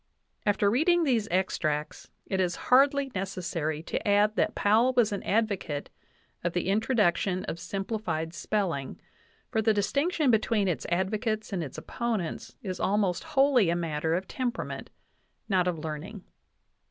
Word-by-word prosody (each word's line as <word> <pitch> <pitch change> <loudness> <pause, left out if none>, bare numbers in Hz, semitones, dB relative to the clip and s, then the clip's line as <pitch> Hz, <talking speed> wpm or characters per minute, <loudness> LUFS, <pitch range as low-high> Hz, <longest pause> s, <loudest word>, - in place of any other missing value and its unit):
After 205 0 +3
reading 340 - +3
these 235 -8 +1
extracts 155 -5 -1 0.2
it 190 - -2
is 180 -2 +1 0.2
hardly 275 +1 +5
necessary 170 -5 -3
to - - -3
add 205 +1 +4
that - - +1
Powell 225 +5 +3
was 230 -3 +4
an 200 - -2
advocate 200 -9 -1 0.5
of 175 -1 -1
the 175 +1 -1
introduction 200 -4 +1
of 165 - -4
simplified 180 -3 -3
spelling, 180 -9 -2 0.5
for 220 -3 +1
the 220 0 +3
distinction 280 - +1
between 215 -2 +2
its 175 - -2
advocates 215 +5 -1
and 175 -3 -1
its 140 - -8
opponents 225 -8 -3
is 185 -3 -4
al 205 - +1
most 190 -4 0
wholly 270 -8 +3
a 170 - +2
matter 160 -1 -1
of 185 +2 -3
temperament, 250 -2 -4 0.6
not 185 -3 +2
of 175 -2 0
learning. 160 +6 -6
200 Hz, 145 wpm, -28 LUFS, 175-225 Hz, 0.6 s, hardly